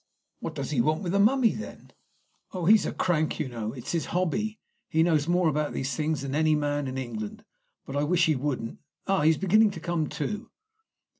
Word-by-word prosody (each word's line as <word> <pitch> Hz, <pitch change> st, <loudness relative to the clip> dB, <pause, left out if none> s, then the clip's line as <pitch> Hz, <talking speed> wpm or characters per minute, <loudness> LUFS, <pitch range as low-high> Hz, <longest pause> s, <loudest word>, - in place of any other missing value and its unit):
"What -, -, -5 dB
does -, -, -4 dB
he 130 Hz, -6 st, +2 dB
want 155 Hz, +8 st, 0 dB
with 175 Hz, -, -2 dB
the 200 Hz, -, +2 dB
mummy, 235 Hz, +3 st, +4 dB
then?" 215 Hz, -, -9 dB, 0.6 s
"Oh, 180 Hz, -3 st, -3 dB
he's 210 Hz, +2 st, +5 dB
a -, -, -2 dB
crank, 160 Hz, -3 st, 0 dB
you 155 Hz, -, -1 dB
know. 115 Hz, -3 st, -4 dB
It's 125 Hz, -1 st, -6 dB
his 165 Hz, -2 st, -1 dB
hobby. 205 Hz, +5 st, -1 dB, 0.3 s
He 160 Hz, +1 st, +3 dB
knows 155 Hz, -3 st, +2 dB
more 175 Hz, 0 st, +3 dB
about 150 Hz, 0 st, 0 dB
these 135 Hz, -1 st, -2 dB
things 155 Hz, 0 st, -1 dB
than 135 Hz, -1 st, -4 dB
any 155 Hz, +1 st, +3 dB
man 145 Hz, -1 st, -1 dB
in 130 Hz, 0 st, -4 dB
England. 115 Hz, -5 st, -5 dB, 0.4 s
But 135 Hz, -, -6 dB
I 145 Hz, -, +1 dB
wish 170 Hz, +3 st, +3 dB
he 155 Hz, -3 st, +2 dB
wouldn't! 130 Hz, -4 st, -3 dB, 0.3 s
Ah, 195 Hz, -1 st, +2 dB
he's 155 Hz, +1 st, +4 dB
beginning 210 Hz, +3 st, +4 dB
to 195 Hz, -, -7 dB
come 170 Hz, -3 st, -1 dB
to." 210 Hz, +8 st, -4 dB
155 Hz, 210 wpm, -27 LUFS, 140-185 Hz, 0.6 s, he's